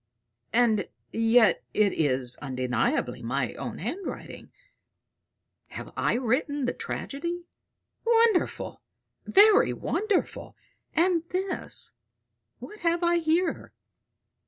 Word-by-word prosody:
And 225 Hz, -3 st, +3 dB, 0.3 s
yet 225 Hz, -3 st, +4 dB
it 210 Hz, -2 st, +3 dB
is 130 Hz, -5 st, 0 dB
undeniably 130 Hz, -, -1 dB
my -, -, -2 dB
own -, -, -6 dB
handwriting. 380 Hz, 0 st, -6 dB, 1.2 s
Have -, -, -8 dB
I -, -, +1 dB
written 265 Hz, +4 st, 0 dB
the -, -, 0 dB
tragedy? 340 Hz, +5 st, -5 dB, 0.6 s
Wonderful, 460 Hz, -4 st, +2 dB, 0.5 s
very 410 Hz, +1 st, +6 dB
wonderful! 415 Hz, -3 st, -2 dB, 0.4 s
And 340 Hz, 0 st, +3 dB
this 370 Hz, 0 st, -2 dB, 0.7 s
what 420 Hz, -, -11 dB
have 340 Hz, 0 st, +1 dB
I 345 Hz, 0 st, +3 dB
here? 330 Hz, +2 st, 0 dB
315 Hz, 90 wpm, -27 LUFS, 225-360 Hz, 1.2 s, very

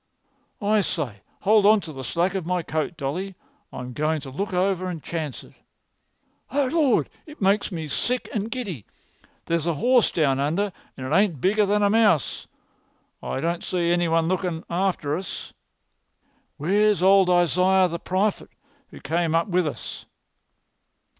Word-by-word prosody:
"I 210 Hz, +1 st, +3 dB
say, 140 Hz, -, -3 dB, 0.2 s
hold 210 Hz, +1 st, +4 dB
on 215 Hz, +1 st, +6 dB
to 160 Hz, -3 st, -8 dB
the 135 Hz, -1 st, -7 dB
slack 175 Hz, +6 st, 0 dB
of 190 Hz, -2 st, -2 dB
my 180 Hz, +1 st, -1 dB
coat, 160 Hz, +2 st, -3 dB
Dolly. 175 Hz, +7 st, -4 dB, 0.4 s
I'm 125 Hz, 0 st, -7 dB
going 155 Hz, +3 st, 0 dB
to 135 Hz, -2 st, -8 dB
look 200 Hz, +10 st, -3 dB
over 185 Hz, 0 st, 0 dB
and 165 Hz, -4 st, -6 dB
chance 155 Hz, -5 st, -4 dB
it. -, -, -17 dB, 1.0 s
Oh, 285 Hz, 0 st, +1 dB
Lord, 305 Hz, -6 st, +3 dB, 0.2 s
it 300 Hz, -, -12 dB
makes 200 Hz, +2 st, +2 dB
me 160 Hz, -3 st, -4 dB
sick 250 Hz, -, -1 dB
and 215 Hz, 0 st, -2 dB
giddy! 205 Hz, -, -5 dB, 0.6 s
There's 170 Hz, -1 st, -1 dB
a 170 Hz, -, +1 dB
horse 245 Hz, -, +3 dB
down 140 Hz, -5 st, +1 dB
under, 175 Hz, +8 st, 0 dB, 0.2 s
and 130 Hz, -, -6 dB
it 140 Hz, +5 st, 0 dB
ain't 190 Hz, -7 st, +2 dB
bigger 205 Hz, +6 st, +2 dB
than 205 Hz, +1 st, +2 dB
a 200 Hz, -, +4 dB
mouse. 215 Hz, -10 st, +2 dB, 0.7 s
I 135 Hz, -, -3 dB
don't 170 Hz, +1 st, -1 dB
see 170 Hz, -2 st, 0 dB
any 175 Hz, 0 st, +2 dB
one 165 Hz, 0 st, +2 dB
lookin' 180 Hz, -2 st, -1 dB
after 175 Hz, -5 st, 0 dB
us. 180 Hz, +1 st, -6 dB, 1.0 s
Where's 200 Hz, +5 st, +2 dB
old 190 Hz, -1 st, +6 dB
Isaiah 180 Hz, +2 st, +4 dB
the 170 Hz, -1 st, -5 dB
prophet 190 Hz, +4 st, -1 dB, 0.4 s
who -, -, -12 dB
came 165 Hz, +2 st, 0 dB
up 165 Hz, +3 st, +1 dB
with 180 Hz, -2 st, +1 dB
us?" 145 Hz, -, -7 dB
180 Hz, 160 wpm, -24 LUFS, 160-200 Hz, 1.0 s, on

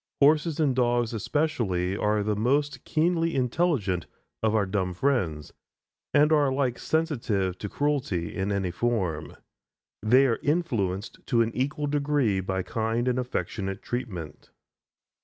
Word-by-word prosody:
Horses 150 Hz, +2 st, +4 dB
and 145 Hz, -5 st, +2 dB
dogs 120 Hz, -2 st, +1 dB
especially 105 Hz, -, 0 dB
are 105 Hz, 0 st, +1 dB
the 105 Hz, 0 st, 0 dB
most 140 Hz, +7 st, 0 dB
keenly 165 Hz, +1 st, +1 dB
intelligent 125 Hz, -, 0 dB, 0.3 s
of 110 Hz, 0 st, +2 dB
our 105 Hz, -2 st, +3 dB
dumb 95 Hz, -2 st, -1 dB
friends, 85 Hz, -, 0 dB, 0.6 s
and 150 Hz, +1 st, +4 dB
are 150 Hz, -2 st, +4 dB
alike 130 Hz, -2 st, 0 dB
sensitive 115 Hz, -, 0 dB
to 105 Hz, -, -4 dB
cruelty 140 Hz, -, -1 dB
in 100 Hz, +1 st, -1 dB
any 95 Hz, -3 st, -1 dB
form. 90 Hz, -7 st, -1 dB, 0.7 s
They 125 Hz, +6 st, +5 dB
are 115 Hz, -4 st, +1 dB
influenced 120 Hz, -, -1 dB
to 115 Hz, -1 st, +3 dB
an 115 Hz, -, -2 dB
equal 145 Hz, +4 st, -1 dB
degree 140 Hz, -8 st, +1 dB
by 95 Hz, 0 st, -2 dB
kind 115 Hz, +4 st, -1 dB
and 125 Hz, 0 st, +1 dB
affectionate 95 Hz, -5 st, -3 dB
treatment. 90 Hz, -11 st, -5 dB
120 Hz, 135 wpm, -27 LUFS, 95-145 Hz, 0.7 s, They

